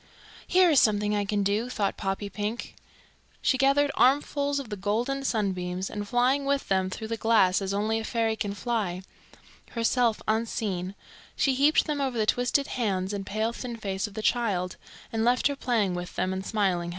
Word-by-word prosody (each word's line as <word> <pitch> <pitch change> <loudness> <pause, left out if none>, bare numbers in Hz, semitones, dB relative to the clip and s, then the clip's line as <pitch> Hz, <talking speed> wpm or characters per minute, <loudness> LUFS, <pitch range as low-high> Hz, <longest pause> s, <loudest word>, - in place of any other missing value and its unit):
"Here 365 -1 +5
is 290 - +6
something 210 -1 +2
I 205 -1 0
can 205 0 0
do," 210 +5 0
thought 210 -5 -1
Poppypink. 205 +3 -4 0.7
She 280 - +2
gathered 275 +2 +3
armfuls 285 +1 +2
of 265 -5 -7
the 210 - -3
golden 230 +8 -1
sunbeams, 185 -6 -1
and 205 -1 -5
flying 255 +5 +2
with 280 0 -1
them 190 -1 +2
through 220 +3 -6
the 230 - -2
glass 210 -5 +3
as 195 0 -2
only 215 +3 0
a - - -5
fairy 225 -1 0
can 205 -2 -3
fly, 205 -6 -2 0.7
herself 230 -1 +2
unseen, 210 -4 -1 0.4
she 270 - +2
heaped 285 +4 +4
them 295 -2 -2
over 260 -3 -1
the 215 - +2
twisted 245 +5 +1
hands 195 -7 -1
and 200 -1 -4
pale 220 +3 -1
thin 240 -1 -6
face 195 -1 -3
of 205 - -13
the 215 - -4
child, 200 -8 0 0.4
and 225 0 0
left 245 +2 +2
her 285 - +3
playing 230 -8 0
with 175 0 -6
them 185 - 0
and 190 0 -4
smiling 190 -5 0
happily. - - -4
220 Hz, 185 wpm, -27 LUFS, 195-250 Hz, 0.7 s, is